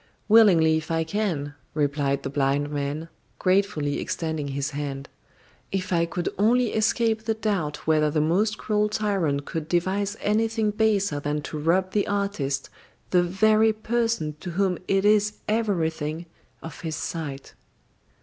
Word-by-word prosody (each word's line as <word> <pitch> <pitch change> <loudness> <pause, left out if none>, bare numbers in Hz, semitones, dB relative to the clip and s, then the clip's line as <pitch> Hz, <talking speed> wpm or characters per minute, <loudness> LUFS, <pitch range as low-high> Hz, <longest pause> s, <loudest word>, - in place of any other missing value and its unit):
"Willingly, 180 -8 +6
if 160 0 -6
I 165 0 +1
can," 160 -6 -2 0.2
replied 145 -2 0
the - - -3
blind 145 +1 0
man, 145 +2 -3 0.3
gratefully 185 -7 +1
extending 160 -3 -3
his 140 +1 -3
hand. 140 -1 -5 0.6
"If 190 -1 -2
I 170 0 +2
could 175 0 -3
only 235 +3 +3
escape 220 0 +1
the 225 -1 0
doubt 195 -9 -2
whether 155 -1 +3
the 155 +1 0
most 195 +8 +1
cruel 210 0 0
tyrant 190 -10 0
could 160 -2 -4
devise 195 +4 0
anything 220 0 +1
baser 205 -7 +1
than 145 +1 -2
to 155 - -5
rob 180 +5 +1
the 205 0 +1
artist, 200 -9 -2 0.4
the 180 - +5
very 215 +5 +3
person 225 -8 -1
to 180 - -6
whom 185 0 0
it 195 0 +2
is 210 0 +4
everything, 170 -7 -1 0.4
of 160 -2 -8
his 160 -2 -3
sight." 145 -5 -5
175 Hz, 145 wpm, -25 LUFS, 150-210 Hz, 0.6 s, Willingly